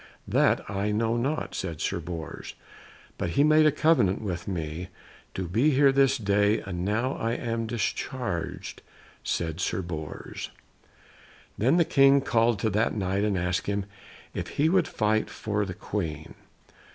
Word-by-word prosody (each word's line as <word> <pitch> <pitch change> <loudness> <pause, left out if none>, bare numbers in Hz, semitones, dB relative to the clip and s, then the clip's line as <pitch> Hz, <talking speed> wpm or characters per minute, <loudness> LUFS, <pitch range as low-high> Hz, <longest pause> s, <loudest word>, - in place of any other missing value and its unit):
"That - - +2
I 100 +1 -1
know 110 +2 +1
not," 135 +6 -1
said 85 -5 -4
Sir - - -1
Bors; 85 -1 -7 0.6
"but - - -1
he 140 - +6
made 155 +1 +6
a - - +5
covenant 150 - +3
with 90 -4 -4
me 85 -1 -4 0.5
to 95 -2 -3
be 115 - +3
here 140 -1 +5
this 135 0 +3
day, 105 -1 +2
and 90 -2 -4
now 110 +7 0
I 115 +1 -1
am 115 -1 -2
discharged," 115 -4 -3 0.4
said 80 0 -2
Sir 95 +2 -1
Bors. 80 -3 -6 1.1
Then 130 - +3
the 170 - +4
King 135 -1 +5
called 115 -2 +2
to 110 - +1
that 105 +3 +1
Knight 95 -1 0
and 105 -2 +1
asked 90 +1 -1
him 100 -1 -1 0.5
if - - -4
he 150 +3 +4
would 185 -1 +3
fight 110 0 0
for 105 -1 -2
the 95 -2 -6
Queen. 80 -8 -4
105 Hz, 155 wpm, -27 LUFS, 90-125 Hz, 1.1 s, he